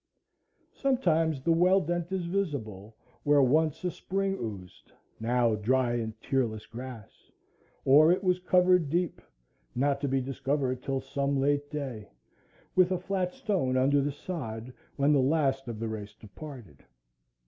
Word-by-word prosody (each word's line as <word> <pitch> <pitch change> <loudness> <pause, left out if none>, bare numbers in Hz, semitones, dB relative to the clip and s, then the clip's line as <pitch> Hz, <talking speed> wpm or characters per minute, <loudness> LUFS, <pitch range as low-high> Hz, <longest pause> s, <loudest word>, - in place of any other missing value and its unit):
Sometimes 165 - +1
the 165 - +2
well 180 +3 +5
dent 175 +1 -3
is 190 -2 -2
visible, 120 - -3 0.3
where 145 -1 +4
once 155 +5 +2
a 180 - 0
spring 195 +2 -2
oozed; 100 -5 -8 0.3
now 120 0 +2
dry 120 +3 +1
and 110 -2 -3
tearless 120 -6 -1
grass; 120 -3 -10 0.6
or 150 +5 +7
it 185 +2 +1
was 180 -1 +2
covered 180 -3 +3
deep,—not 140 - -3
to 145 - 0
be 135 0 +1
discovered 135 0 -2
till 135 0 -2
some 140 0 -1
late 145 +1 +1
day,—with 135 - -3
a 185 - +1
flat 185 0 -2
stone 175 - 0
under 140 +2 +3
the 145 +1 -1
sod, 130 -7 -6 0.2
when 140 +2 +3
the 140 - +4
last 135 -2 +1
of 115 -2 -5
the 115 - -2
race 105 -1 -6
departed. 110 - -11
140 Hz, 140 wpm, -29 LUFS, 120-170 Hz, 0.6 s, or